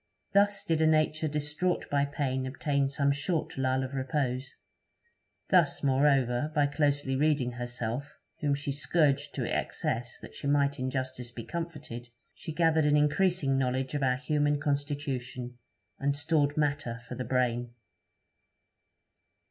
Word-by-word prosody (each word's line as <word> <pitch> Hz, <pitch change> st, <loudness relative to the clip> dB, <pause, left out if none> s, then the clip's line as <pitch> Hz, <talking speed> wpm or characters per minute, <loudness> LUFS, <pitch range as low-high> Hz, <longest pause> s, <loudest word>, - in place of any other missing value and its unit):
Thus 200 Hz, 0 st, +4 dB
did 160 Hz, -1 st, +1 dB
a 160 Hz, -, +5 dB
nature 155 Hz, 0 st, +2 dB
distraught 150 Hz, +4 st, -1 dB
by 140 Hz, 0 st, +3 dB
pain 130 Hz, -2 st, -2 dB
obtain 140 Hz, +1 st, 0 dB
some 140 Hz, 0 st, +1 dB
short 150 Hz, +3 st, -1 dB
lull 130 Hz, 0 st, +1 dB
of 130 Hz, +1 st, -5 dB
repose. 130 Hz, -2 st, -2 dB, 0.9 s
Thus, 175 Hz, -7 st, +3 dB
moreover, 135 Hz, 0 st, +3 dB
by 145 Hz, -1 st, +4 dB
closely 145 Hz, -2 st, +1 dB
reading 140 Hz, -3 st, +2 dB
herself, 120 Hz, +3 st, -4 dB, 0.2 s
whom 145 Hz, -1 st, +1 dB
she 140 Hz, 0 st, -3 dB
scourged 145 Hz, 0 st, +1 dB
to -, -, -1 dB
excess 120 Hz, +2 st, -2 dB
that -, -, -12 dB
she -, -, -5 dB
might 140 Hz, 0 st, +2 dB
in 130 Hz, 0 st, -1 dB
justice 130 Hz, -2 st, -4 dB
be 120 Hz, -1 st, -8 dB
comforted, 150 Hz, -8 st, -6 dB, 0.2 s
she 160 Hz, -, -7 dB
gathered 160 Hz, -1 st, +3 dB
an 150 Hz, 0 st, +4 dB
increasing 150 Hz, -2 st, +2 dB
knowledge 130 Hz, +1 st, -1 dB
of 145 Hz, -, -1 dB
our 130 Hz, -1 st, +2 dB
human 145 Hz, 0 st, +1 dB
constitution, 140 Hz, -4 st, -3 dB, 0.4 s
and 140 Hz, 0 st, 0 dB
stored 145 Hz, -1 st, +1 dB
matter 140 Hz, -6 st, -1 dB
for -, -, -6 dB
the 130 Hz, -, -3 dB
brain. 120 Hz, -1 st, 0 dB
140 Hz, 140 wpm, -29 LUFS, 130-150 Hz, 0.9 s, a